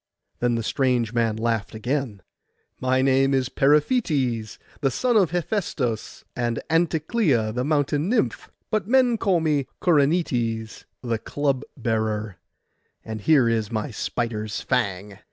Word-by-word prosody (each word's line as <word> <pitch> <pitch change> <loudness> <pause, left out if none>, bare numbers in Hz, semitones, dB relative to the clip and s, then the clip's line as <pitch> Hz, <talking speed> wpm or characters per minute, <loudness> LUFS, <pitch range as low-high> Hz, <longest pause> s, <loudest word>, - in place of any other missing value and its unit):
Then 120 -1 +1
the 115 - -2
strange 125 -2 0
man 115 -2 +1
laughed 115 -2 -1
again— 120 -3 -3 0.6
'My 130 0 +1
name 135 0 +3
is 130 -1 0
Periphetes, 140 - +1 0.2
the 135 - +1
son 245 - 0
of 195 -6 +4
Hephaistos 165 - -2
and 120 -1 -1
Anticleia 160 - +1
the 125 +2 -1
mountain 145 +2 0
nymph. 125 - 0 0.2
But 215 -4 0
men 245 -2 +3
call 185 -4 +2
me 150 -4 +1
Corynetes 140 - +1 0.2
the 115 -2 -1
club 140 +1 -1 0.2
bearer; 110 -4 -2 0.7
and 110 -1 -5
here 140 -2 +4
is 115 -2 0
my 110 +1 -2
spider's 110 -1 -3
fang. 100 -5 -2
130 Hz, 130 wpm, -24 LUFS, 110-150 Hz, 0.7 s, of